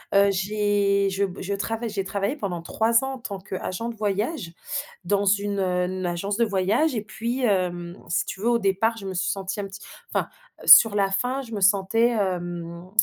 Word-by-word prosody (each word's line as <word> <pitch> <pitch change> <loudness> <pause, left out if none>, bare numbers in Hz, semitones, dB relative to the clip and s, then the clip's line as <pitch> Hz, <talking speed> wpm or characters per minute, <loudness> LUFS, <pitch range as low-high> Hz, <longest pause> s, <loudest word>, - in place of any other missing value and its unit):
Heu, 200 0 +6
j'ai 200 0 +1
je 195 +1 0
b 190 0 -8
je 200 +2 -3
travaille 225 +3 -3
j'ai 200 -2 -2
travaillé 200 +7 -2
pendant 185 -8 -3
3 230 +7 +2
ans 270 - -3
en 260 - -11
tant 200 -4 -6
qu'agent 190 +3 -5
de 235 - -6
voyage 210 - -2 0.5
dans 200 +2 +1
une 200 0 +1
heu, 185 0 -1
agence 175 +4 -2
de 235 - +3
voyage 215 +9 +1
et 220 - -2
puis, 235 +4 -4
hem, 180 -4 0
si 170 - +1
tu 190 - -7
veux 230 - +2
au 235 -1 +3
départ 220 +3 +1
je 200 - -8
me 190 - -4
suis 185 +1 -1
sentie 195 +1 -4
un - - -4
petit 195 +1 -11 0.3
enfin - - 0 0.4
sur 225 -2 +9
la 200 -1 +2
fin 250 +8 0
je 230 -4 -10
me 205 - -3
sentais, 200 +4 +3
hem 175 -4 -3
200 Hz, 205 wpm, -24 LUFS, 190-220 Hz, 0.5 s, sur